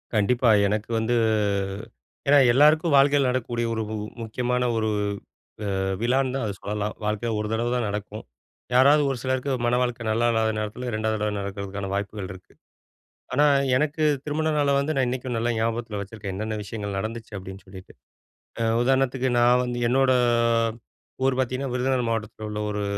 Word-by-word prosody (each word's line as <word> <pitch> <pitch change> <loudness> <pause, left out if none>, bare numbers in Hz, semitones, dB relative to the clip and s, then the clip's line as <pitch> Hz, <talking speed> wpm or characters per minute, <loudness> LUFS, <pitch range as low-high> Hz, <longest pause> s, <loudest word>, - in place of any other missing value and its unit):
கண்டிப்பா. 120 +4 +3 0.2
எனக்கு 105 +2 -2
வந்து 115 +2 0 1.1
ஏன்னா 145 +1 +6 0.2
எல்லாருக்கும் 155 +4 +4
வாழ்க்கையில 140 0 +4
நடக்கக்கூடிய 120 -2 -1
ஒரு 110 - -2
உ - - -2 0.3
முக்கியமான 125 +2 -1
ஒரு 110 -1 0 0.9
அ, - - -1 0.2
விழான்னு 130 +2 +1
தான் 135 -3 -1
அத 105 - -2
சொல்லலாம். 105 0 -3
வாழ்க்கையில 105 +2 -1
1 105 - -3
தடவ 120 +2 0
தான் 120 - 0
நடக்கும். 105 +1 -5 0.5
யாராவது 140 +4 +6
ஒரு 135 - -2
சிலருக்கு 130 +1 -1 0.2
மணவாழ்க்கை 120 -1 0
நல்லா 115 +2 +2
இல்லாத 110 -1 +1
நேரத்துல 110 +4 -4
2வது 110 0 -1
தடவ 105 -1 -1
நடக்கிறதுக்கான 100 0 -5
வாய்ப்புகள் 100 -1 -4
இருக்கு. 90 -1 -15 0.8
ஆனா, 145 +3 +4 0.3
எனக்கு 150 +3 0 0.2
திருமண 155 +1 -1
நாள 145 -1 +2
வந்து 140 +3 0
நான் 135 -1 +2
இன்னைக்கும் 125 0 -3
நல்லா 120 +1 0
ஞாபகத்தில 115 -1 -2
வச்சுருக்கேன். 100 -1 -7
என்னென்ன 110 +2 -3
விஷயங்கள் 105 -1 -5
நடந்துச்சு 110 +2 -5
அப்பிடின்னு 95 +1 -9
சொல்லிட்டு. 95 0 -12 0.7
அ, - - +2 0.2
உதாரணத்துக்கு 130 0 +1
நான் 120 +1 +5
வந்து, 120 -1 -3
என்னோட 130 +2 +3 1.1
ஊர் 135 -1 +2
பாத்தீங்கன்னா 130 +1 -1
விருதுநகர் 125 -1 0
மாவட்டத்தில 110 -1 -4
உள்ள 105 0 -4
ஒரு 105 0 -2
120 Hz, 155 wpm, -25 LUFS, 105-130 Hz, 1.1 s, ஏன்னா